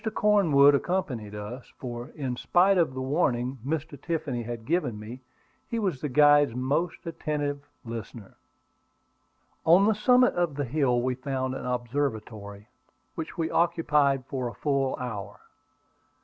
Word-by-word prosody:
Cornwood 160 -10 +5
accompanied 135 - -2
us, 105 +5 -8
for, 120 -1 -6
in 130 -5 -3
spite 185 +8 +3
of 155 -6 +1
the 130 - -3
warning 130 -3 0
Mr. 145 0 -4
Tiffany 145 -7 -2
had 115 -1 -6
given 140 -9 -1
me, 115 +5 -9 0.5
he 230 - -3
was 185 - -1
the 150 - -2
guide's 145 -1 +5
most 140 +7 -1
attentive 145 -3 -3 0.2
listener. 115 -2 -8 1.3
On 175 +5 +6
the 220 - +4
summit 250 +4 +4
of 175 -4 0
the 145 0 -2
hill 125 -2 +1
we 130 0 0
found 130 0 -3
an 130 - -5
observatory, 110 -5 -3 0.5
which 160 -1 -6
we 165 -1 -1
occupied 150 -6 +2
for 130 -2 -3
a 120 - -7
full 140 -3 0
hour. 105 -6 -6
140 Hz, 140 wpm, -27 LUFS, 120-160 Hz, 1.3 s, On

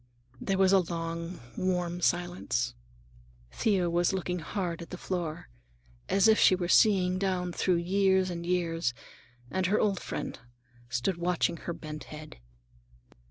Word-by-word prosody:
There 195 - -1
was 190 0 +4
a 195 - +7
long, 170 0 -4 0.2
warm 180 -1 -1
silence. 175 -9 0 0.8
Thea 195 -5 +1
was 175 +2 +2
looking 180 -1 -2
hard 170 0 -3
at 170 - -9
the 180 - -6
floor, 175 -4 -4 0.6
as 200 +2 +4
if 220 0 +5
she 185 - +6
were 180 -1 -2
seeing 185 -2 +4
down 180 -2 -1
through 180 +1 +2
years 190 +1 +2
and 170 -1 -5
years, 170 -7 0 0.6
and 185 -1 +1
her 205 +3 +2
old 200 -3 +1
friend - - -5 0.5
stood 125 +9 -1
watching 175 -1 0
her 170 - -5
bent 155 -2 -8
head. 155 0 -10
180 Hz, 145 wpm, -29 LUFS, 170-190 Hz, 0.8 s, a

